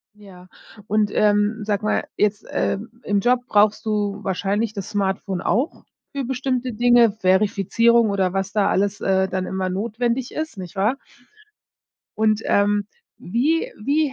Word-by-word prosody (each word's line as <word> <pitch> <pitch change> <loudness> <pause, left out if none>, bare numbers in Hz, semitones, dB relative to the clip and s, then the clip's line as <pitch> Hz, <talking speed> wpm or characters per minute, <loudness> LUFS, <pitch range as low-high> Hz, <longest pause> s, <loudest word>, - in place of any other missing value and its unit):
Ja 185 -3 -15 0.4
und, 210 -1 +1
ähm, 210 +1 +2
sage 205 0 -1
mal, - - 0
jetzt, 205 -1 0
äh, - - -1 0.2
im 205 -1 0
Job 245 +3 +2
brauchst 210 +1 +3
du 205 -1 -1
wahrscheinlich 200 +3 -1
das 200 -2 -6
Smartphone 195 -2 -2
auch 260 - -1 0.3
für 275 -2 -2
bestimmte 255 -1 -2
Dinge, 240 -1 +5
Verifizierung 215 +3 +2
oder 190 -2 0
was 195 +1 -2
da 205 -2 +2
alles, 200 +1 0
äh, 190 0 +2
dann 185 0 -2
immer 190 -1 -2
notwendig 235 +5 -2
ist, 310 -9 -4
nicht 180 +1 -8
wahr? 215 +8 +1 1.2
Und, 215 0 +2
ähm, 205 0 +2 0.3
wie 275 - 0
wie 285 +2 +1
210 Hz, 145 wpm, -22 LUFS, 195-235 Hz, 1.2 s, Dinge